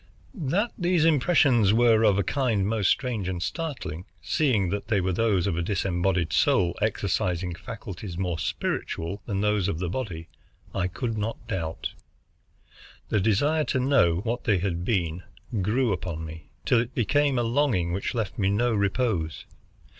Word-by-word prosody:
That 195 - 0
these 175 -2 +2
impressions 135 - +4
were 115 -1 +5
of 100 -3 +4
a 100 - +2
kind 115 -4 0
most 105 -3 +1
strange 120 -8 0
and 90 -2 -3
startling, 130 - -4
seeing 100 - +1
that 100 0 -3
they 105 -4 +2
were 95 0 0
those 100 -3 +2
of 100 -4 0
a 85 - -1
disembodied 90 -1 0
soul 85 -2 +3
exercising 90 0 0
faculties 100 -3 -7
more 90 -3 -2
spiritual 85 +5 -3
than 100 -3 -1
those 105 -3 +1
of 100 - -1
the 90 0 -2
body, 90 -7 -4 0.5
I 90 -2 0
could 110 +4 -3
not 110 +2 -4
doubt. 85 -7 -3 1.2
The 110 - +2
desire 145 +10 +2
to 130 - 0
know 125 -11 +3
what 120 +2 -3
they 105 -4 +3
had 90 -2 -2
been 90 -5 -1 0.4
grew 110 +4 +1
upon 85 -3 -4
me, 80 -1 -10 0.2
till 120 - +4
it 120 +2 -3
became 140 +3 +2
a 120 - +2
longing 115 -9 +1
which 100 +6 -2
left 110 -4 -3
me 95 -1 +2
no 115 +4 +2
repose. 100 -5 0
100 Hz, 160 wpm, -26 LUFS, 90-120 Hz, 1.2 s, were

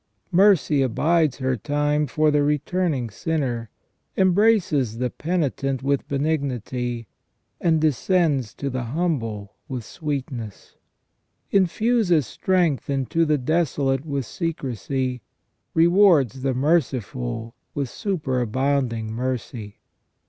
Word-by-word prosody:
Mercy 180 -6 +4
abides 150 +4 +2
her 130 -1 0
time 145 +5 0
for 155 +1 +2
the 145 0 +3
returning 150 -1 0
sinner, 125 -4 -2 0.5
embraces 185 - +3
the 125 0 -1
penitent 140 -6 -1
with 140 0 0
benignity, 130 -5 -2 0.5
and 165 -2 +2
descends 155 - +1
to 140 -1 -3
the 130 0 -2 0.2
humble 115 - -2
with 130 -5 -4
sweetness; 130 - -5 0.8
infuses 195 - +2
strength 170 - 0
into 140 +4 +1
the 150 -1 +2
desolate 140 -2 0
with 140 -4 -3
secrecy; 130 - -3 0.5
rewards 165 - +4
the 130 -1 0
merciful 120 - -1 0.2
with 140 -2 -1
superabounding 130 - -1
mercy. 120 -3 -4
140 Hz, 100 wpm, -23 LUFS, 125-165 Hz, 0.8 s, Mercy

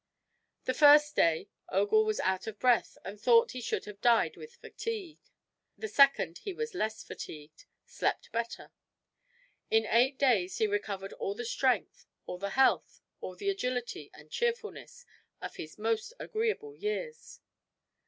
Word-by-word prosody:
The 255 - +1
first 295 +1 +6
day 165 -1 +2 0.2
Ogul 205 +3 +3
was 215 0 -1
out 190 +1 -1
of 215 -1 -5
breath 245 -1 +2
and 200 +2 -8
thought 230 -1 +5
he 255 - -6
should - - -2
have 205 -1 -10
died 235 -1 +3
with 465 +1 -12
fatigue. 430 -9 -6 0.6
The 440 - -4
second 275 - +4
he 395 - -5
was 460 +2 -4
less 220 -10 -2
fatigued, 150 0 -10 0.2
slept - - -2
better. 230 0 -4 1.0
In 445 -1 +3
eight 255 +4 +3
days 220 -10 +2
he 220 - +2
recovered 200 -2 -3
all 200 - -3
the 240 +2 -5
strength, 245 -2 0 0.2
all 180 - -6
the 200 +1 -3
health, 265 +6 +2 0.2
all - - -7
the 400 -1 -1
agility 250 - -3
and 150 +1 -16
cheerfulness 475 +1 -3 0.3
of - - -7
his 155 - -8
most 225 - -1
agreeable 435 -1 -2
years. 460 +3 -5
245 Hz, 150 wpm, -30 LUFS, -, 1.0 s, first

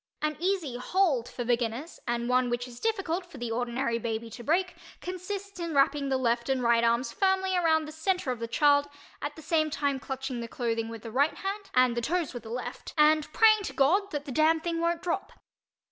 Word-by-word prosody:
An 305 0 -1
easy 345 -8 -1
"hold" 280 -3 +1
for 245 - -5
beginners 240 +5 -1
and 240 0 -1
one 250 0 +2
which 240 +1 -2
is 240 -1 -11
difficult 390 -5 -1
for 345 -5 -13
the 240 -2 -4
ordinary 240 0 -1
baby 230 0 -4
to 240 - -9
break 360 +7 +1 0.3
consists 375 +2 -6
in 335 -3 -3
wrapping 280 0 +3
the 265 - +2
left 235 -1 0
and 265 -2 +1
right 235 0 +4
arms 235 +3 +2
firmly 380 -1 +1
around 320 -3 +3
the 305 - -8
center 320 -2 -1
of 245 - -4
the 230 - -3
child, 285 +4 +4 0.3
at 295 - -4
the 315 - -11
same 310 0 +1
time 285 -2 -1
clutching 265 -2 -4
the 235 - -4
clothing 230 -1 -2
with 230 -1 -8
the 225 - -7
right 280 +6 +2
hand 395 +1 -4
and 255 -1 +4
the 235 - -1
toes 335 +4 -1
with 245 - -6
the 220 - -11
left 245 +2 -6
and 305 0 +4
praying 435 +2 +5
to 395 - -5
God 375 +9 +3
that 290 -5 -4
the 280 - -6
damn 315 +4 +3
thing 335 0 -2
won't 335 0 0
drop. 345 - -2
285 Hz, 220 wpm, -28 LUFS, 240-340 Hz, 0.3 s, praying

